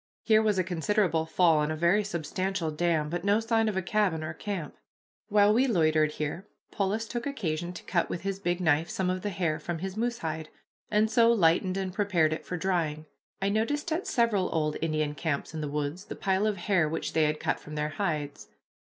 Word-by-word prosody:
Here 220 -1 +5
was 210 -2 +1
a 185 - +3
considerable 175 -1 0
fall, 165 -2 +4
and 150 +1 0
a - - -1
very 170 +6 +3
substantial 185 -1 -2
dam, 160 -1 +1
but 175 +3 -3
no 205 +2 +3
sign 225 -1 +1
of 200 - -3
a 190 - 0
cabin 185 -4 +1
or 155 0 -4
camp. 180 -4 -5 0.5
While 205 0 +5
we 255 +4 +3
loitered 155 -7 +2
here 155 +6 -4 0.2
Polis 210 +3 -1
took 240 +3 -4
occasion 175 - -2
to 180 - -9
cut 170 -3 0
with 170 - -4
his 195 -1 -2
big 175 -2 -1
knife 160 0 +2
some 185 -1 -1
of 185 0 -3
the 205 - -2
hair 170 -5 -1
from 170 +2 -4
his 190 +3 -5
moose 235 +2 -1
hide, 160 -3 -4 0.4
and 215 +1 +2
so 230 +1 +5
lightened 185 -2 +3
and 190 -1 -3
prepared 180 -6 +2
it 155 - -7
for 180 - -3
drying. 165 -4 -1 0.4
I 195 - +2
noticed 290 +10 -1
at 330 +4 -1
several 220 -6 +2
old 155 -2 0
Indian 155 -2 0
camps 150 -1 -3
in 160 - -4
the 150 - -3
woods 150 +6 -3
the - - -7
pile 195 +2 +1
of 210 -2 -1
hair 175 -3 +1
which 165 - -3
they 160 -1 +3
had 150 0 0
cut - - -1
from 150 - -9
their 150 0 -1
hides. 150 -5 -3
180 Hz, 215 wpm, -28 LUFS, 155-205 Hz, 0.5 s, Here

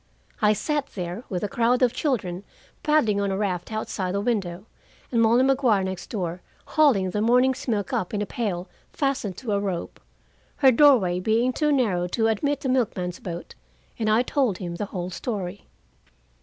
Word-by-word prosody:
I 210 0 +5
sat 290 +6 -1
there, 180 +4 -4
with 185 -1 -3
a - - +1
crowd 245 +1 +2
of 245 -1 +3
children 200 - -2 0.4
paddling 240 -10 +2
on 200 - 0
a 190 - -1
raft 190 -2 -2
outside 195 -3 -3
the - - +1
window, 200 -4 -2 0.5
and 230 -2 +2
Molly 230 +3 +5
Maguire, 260 -7 +3
next 190 -1 -5
door, 180 -4 -3 0.3
hauling 245 - +3
the 210 - -1
morning's 250 +4 +2
milk 205 -5 -1
up 180 - -1
in 210 - -2
a 210 - -1
pail 195 -5 -3 0.2
fastened 270 - -1
to 240 -5 -4
a 200 - +2
rope, 190 -4 -4 0.6
her 265 -2 +5
doorway 230 -10 +5
being 225 +6 +1
too 300 +2 +1
narrow 205 -11 +1
to 225 +5 0
admit 280 +6 0
the - - -2
milkman's 195 -8 -1
boat, 170 -1 -7 0.5
and 215 -1 +1
I 220 +3 +4
told 255 -7 0
him 175 -2 -5
the 205 - -2
whole 180 -2 -5
story. 200 -2 -5
215 Hz, 180 wpm, -25 LUFS, 185-250 Hz, 0.6 s, I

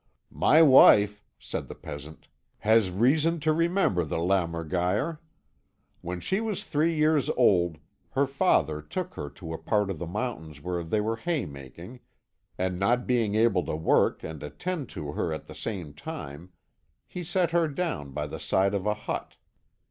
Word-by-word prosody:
"My 160 +2 +5
wife," 105 -7 +7
said - - -5
the - - -8
peasant, 75 +2 -10 0.3
"has 110 -2 +4
reason 150 - +2
to 155 +1 +2
remember 165 - +2
the 75 - -3
lämmergeier. 90 - 0 0.8
When 90 +1 -5
she 190 - -1
was 220 -4 -3
three 160 +3 +1
years 155 -2 +2
old 90 -9 +3 0.4
her 140 +1 +3
father 130 - +1
took 75 - -5
her 75 - -6
to 80 +2 -8
a 80 - -5
part 105 +4 0
of 85 - -6
the 85 - -4
mountains 85 - -4
where 90 +2 -3
they 105 +6 0
were 110 +2 -1
hay 160 - -1
making, 75 - -10 0.6
and 90 -1 -1
not 120 +6 +2
being 115 -5 +1
able 110 -5 +3
to - - -2
work 80 +1 +2
and 80 -1 -7
attend 160 - -4
to 75 -1 -6
her 80 - -2
at 80 - -5
the - - -11
same 90 -10 -5
time, 75 +3 -8 0.5
he 180 - -7
set 175 0 0
her 170 -1 +3
down 150 - -3
by 75 +2 -3
the 75 +1 -7
side 95 +6 +1
of 100 0 -1
a 105 - +1
hut. 105 - -5
100 Hz, 170 wpm, -27 LUFS, -, 0.8 s, wife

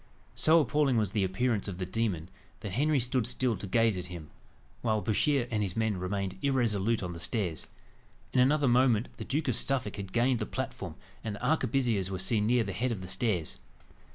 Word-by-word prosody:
So 160 +1 +5
appalling 145 -4 +2
was 105 -4 +1
the 105 -2 +1
appearance 105 +3 0
of 95 -3 -5
the 90 - -3
demon, 95 -4 -2 0.3
that 105 - -5
Henry 145 +7 +2
stood 125 -1 +1
still 125 -1 0
to 100 - -6
gaze 115 +1 +3
at 90 -1 -5
him, 85 -4 -9 0.5
while 110 -2 +1
Bouchier 120 +5 +1
and 105 -2 0
his 95 -2 -2
men 110 -2 +1
remained 95 +1 -3
irresolute 115 -6 +1
on 90 -1 -4
the 85 - -8
stairs. 85 - -2 0.7
In 130 - +3
another 140 +2 +4
moment, 120 -2 +3
the - - -5
Duke 150 +3 -1
of 125 - +1
Suffolk 135 -1 0
had 100 -2 -6
gained 120 +2 +2
the 110 - -3
platform, - - -5 0.3
and 110 -2 -3
the - - -6
arquebusiers 125 - +1
were 95 - -3
seen 105 +3 +1
near 120 0 +3
the - - -4
head 125 +1 -1
of 105 -5 -3
the 90 - -7
stairs. 90 - -1
110 Hz, 205 wpm, -30 LUFS, 95-125 Hz, 0.7 s, So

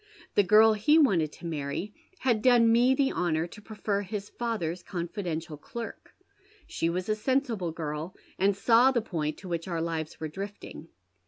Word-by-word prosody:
The - - +5
girl 215 +3 +6
he 220 +9 +4
wanted 180 - +3
to - - -12
many 160 +5 -4 0.2
had 240 -8 +1
done 235 -1 +5
me 245 +3 +4
the 270 0 +2
honour 165 -2 0
to 190 +5 -12
prefer 210 -1 -2
his 205 0 -5
father's 185 -8 -3
confidential 170 -4 -4
clerk. 230 +9 -8 0.5
She 165 - -1
was 180 +2 -2
a 215 - +2
sensible 225 - -1
girl, 155 +2 -5 0.2
and 195 +1 +2
saw 235 +5 +5
the 240 -4 0
point 155 -7 -3
to 190 - -10
wliich 170 -1 -3
our 170 -2 -2
lives 160 -2 -3
were 160 - -3
drifting. 200 +6 -8
195 Hz, 170 wpm, -28 LUFS, 165-225 Hz, 0.5 s, girl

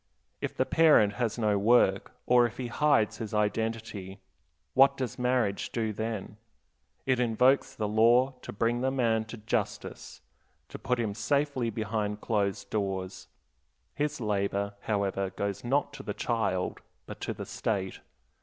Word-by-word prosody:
If - - -4
the - - +2
parent 150 -11 +5
has 115 -1 0
no 105 -3 +2
work, 100 -2 +3
or 120 -1 +5
if 115 - -12
he 125 -2 -4
hides 115 -6 +2
his 110 -1 -5
identity, 105 -2 -2 0.5
what 135 +1 +5
does 130 -1 -4
marriage 125 -5 0
do 110 -2 -1
then? 110 -1 -4 0.7
It 130 -1 +2
invokes 125 +3 +3
the 105 - -2
law 120 +5 +4
to - - -7
bring 115 +3 0
the 130 - +2
man 115 -4 +1
to 115 +2 -9
"justice," 105 -1 -4 0.5
to - - -8
put 125 -1 -1
him 110 -3 -1
safely 135 +3 0
behind 105 -1 -2
closed 100 -3 -1
doors; 95 -3 -3 0.7
his 150 -1 -2
labor, 100 -2 -1
however, 100 -2 -1
goes 100 +1 -4
not 140 +3 0
to 145 - -8
the - - -5
child, 100 -6 -1 0.2
but - - -9
to - - -2
the - - -6
State. 95 -4 -3
110 Hz, 150 wpm, -29 LUFS, 105-125 Hz, 0.7 s, parent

